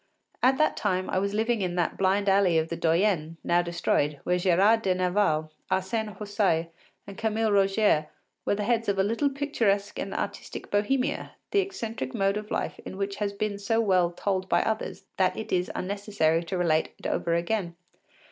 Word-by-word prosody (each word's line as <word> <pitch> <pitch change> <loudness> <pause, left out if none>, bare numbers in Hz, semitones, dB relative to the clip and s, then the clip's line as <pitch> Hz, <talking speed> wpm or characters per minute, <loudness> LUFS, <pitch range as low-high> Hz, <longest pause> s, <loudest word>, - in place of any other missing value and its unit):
At 260 +1 +4
that 310 - +2
time 185 -3 -1
I 185 - +1
was 200 +1 -1
living 225 0 +1
in 180 -2 -1
that 175 -2 0
blind 195 +1 +1
alley 195 -3 +4
of 160 0 0
the 170 - -2
Doyenné, 165 -1 +1
now 175 0 +3
destroyed, 170 -4 0
where 180 0 +1
Gérard 195 +5 +4
de 190 -3 +1
Nerval, 180 -4 +1 0.2
Arsène 190 +2 -1
Houssaye 200 -6 0 0.4
and 200 -1 -10
Camille 220 0 +1
Rogier 195 -5 +3 0.4
were - - +1
the 210 - -2
heads 230 0 +1
of 200 - +1
a 190 - +3
little 230 +8 +1
picturesque 230 -8 0
and - - -4
artistic - - -5
Bohemia, 250 +6 0 0.2
the 405 - +3
eccentric 255 - -4
mode 195 -1 +1
of 210 0 -6
life - - -2
in 190 - -8
which 200 0 -3
has 205 -1 -1
been 200 0 -3
so 225 +3 +1
well 185 -5 +3
told 190 +1 -2
by - - +3
others 220 0 -3
that 185 -1 +2
it 220 - -6
is 180 -1 +1
unnecessary 190 -4 0
to 185 +2 -3
relate 160 -3 +1
it - - -16
over 170 -1 0
again. 175 0 -1
195 Hz, 185 wpm, -27 LUFS, 180-215 Hz, 0.4 s, At